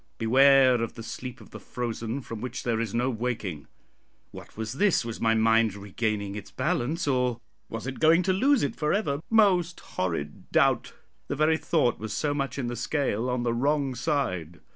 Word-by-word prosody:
Beware 130 +1 +5
of 115 - -3
the 115 - -8
sleep 125 +2 -7
of - - -15
the - - -9
frozen, 120 +1 -4
from 115 -3 -8
which 125 0 -5
there 115 -2 0
is 115 -3 -2
no 125 +4 0
waking." 110 - -4 0.6
What - - -12
was 110 +1 -4
this? 190 - +2
was 115 0 -6
my 115 0 +3
mind 115 -1 +3
regaining 100 0 -3
its 105 -1 -8
balance, 155 +2 -1
or 125 -3 +1 0.3
was 115 +1 -6
it 130 0 -5
going 165 +3 +5
to 185 - +2
lose 270 +8 +3
it 140 - -1
for 150 0 0
ever? 150 -9 0
Most 185 -6 +3
horrid 80 -5 -4
doubt! - - +2 0.3
the - - -2
very 155 +2 +3
thought 150 -7 +1
was 110 -2 -5
so 145 +7 0
much 140 -1 -3
in 135 - -2
the 120 0 -3
scale 125 -2 -1
on 125 -1 -1
the 120 -1 0
wrong 140 +2 +1
side. 90 - -2
125 Hz, 190 wpm, -27 LUFS, 115-145 Hz, 0.6 s, Beware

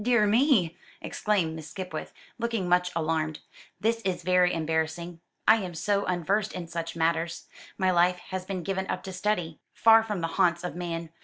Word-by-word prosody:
"Dear 240 -2 +4
me!" 215 - +3 0.2
exclaimed 185 -7 0
Miss 160 -1 -8
Skipwith, 185 -2 -6 0.3
looking 230 -5 -1
much 180 0 +3
alarmed; 155 -1 0 0.4
"this 230 +1 +1
is 185 -3 -2
very 180 0 +4
embarrassing. 160 +1 -2 0.3
I 220 +1 +8
am 185 -5 -5
so 200 +4 0
unversed 195 +4 0
in 180 - -5
such 165 -1 -4
matters. 165 0 0 0.3
My 185 -1 +2
life 180 +1 +3
has 185 -1 -3
been 185 -1 -4
given 190 0 -2
up - - -3
to 190 - -6
study, 180 -4 -1 0.2
far 225 0 +7
from 210 -5 -3
the 165 - 0
haunts 170 0 +3
of 180 - -4
man. 170 -2 -4
180 Hz, 175 wpm, -27 LUFS, 165-200 Hz, 0.4 s, I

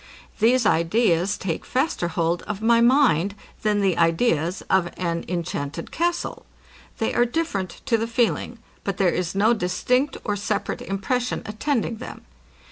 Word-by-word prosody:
These 240 +2 +4
ideas 180 +1 +2
take 165 -4 -3
faster 260 - 0
hold 170 +1 0
of 205 -2 -3
my 230 +1 +4
mind, 235 - +4 0.3
than 210 -1 +1
the 190 -4 +1
ideas 165 0 +1
of 185 -2 +2
an 170 -2 -2
inchanted 165 -3 -4
castle. 345 +1 -1 0.5
They 225 - -1
are 240 - +4
different 240 - -2
to 230 -2 +2
the 225 - -1
feeling; 235 0 0 0.3
but 195 -2 -2
there 190 -2 +3
is 180 0 -2
no 215 +4 +4
distinct 250 +8 0
or 205 - -1
separate 200 - -2
impression 240 +6 -2
attending 230 +1 -1
them. 250 - -9
205 Hz, 145 wpm, -23 LUFS, 175-240 Hz, 0.5 s, These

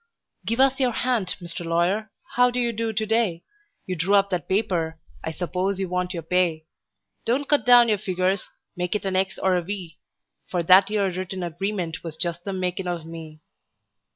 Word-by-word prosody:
"GIVE 230 +3 0
US 270 0 +4
YOUR 255 -2 +2
HAND, 230 -6 0
MR. 175 -1 -6
LAWYER: 175 +6 +1 0.2
HOW 250 0 +5
DO 245 0 -2
YOU 240 -1 +1
DO 225 0 -1
TO 220 0 -1
DAY?" 215 -6 +1 0.4
You 185 - -3
drew 180 +5 +2
up 200 0 +3
that 175 -4 -2
paper 180 -6 0 0.3
I 160 - -2
s'pose 185 +3 -2
you 190 -2 -2
want 180 0 -1
your 165 - -4
pay. 165 -2 +1 0.6
Don't 270 +5 0
cut 295 -4 +2
down 245 -1 +8
your 210 -3 +2
figures; 185 -1 0 0.3
make 180 +2 -2
it 210 - -2
an 190 -1 -1
X 190 0 0
or 190 -1 +2
a 180 - +1
V; 175 -3 -6 0.5
For 175 -2 0
that 185 +4 +7
'ere 200 -3 +1
written 185 +1 -4
agreement 175 0 -3
was 160 -2 -6
just 170 0 -2
the 200 - -2
makin' 185 0 -2
of 175 -2 -3
me. 160 -2 -9
185 Hz, 195 wpm, -24 LUFS, 175-210 Hz, 0.6 s, down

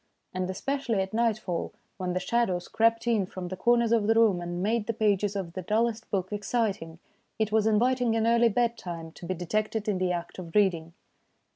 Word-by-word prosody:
And 185 0 -2
especially 230 +3 -1
at 190 - -9
nightfall, 215 -7 -1 0.2
when 180 -2 -2
the 180 - 0
shadows 185 -4 0
crept 230 +1 +2
in 220 -5 +1
from 180 -1 -6
the 185 - -4
corners 235 +3 +2
of 225 -3 +3
the 225 - +4
room 215 -6 +4
and 175 +1 -4
made 220 +1 0
the 230 - -1
pages 205 -2 +1
of 180 -4 -4
the 185 - -4
dullest 225 +4 0
book 190 0 -2
exciting, 205 -6 -2 0.4
it 220 -1 0
was 220 0 +3
inviting 240 +2 +2
an 225 0 +1
early 235 0 +4
bed 235 +1 0
time 165 -2 -7
to 170 - -10
be 185 - -1
detected 215 +5 -2
in 200 -3 0
the 185 -1 +1
act 170 +1 -4
of 170 -3 -9
reading. 170 -5 +2
210 Hz, 205 wpm, -28 LUFS, 185-230 Hz, 0.4 s, the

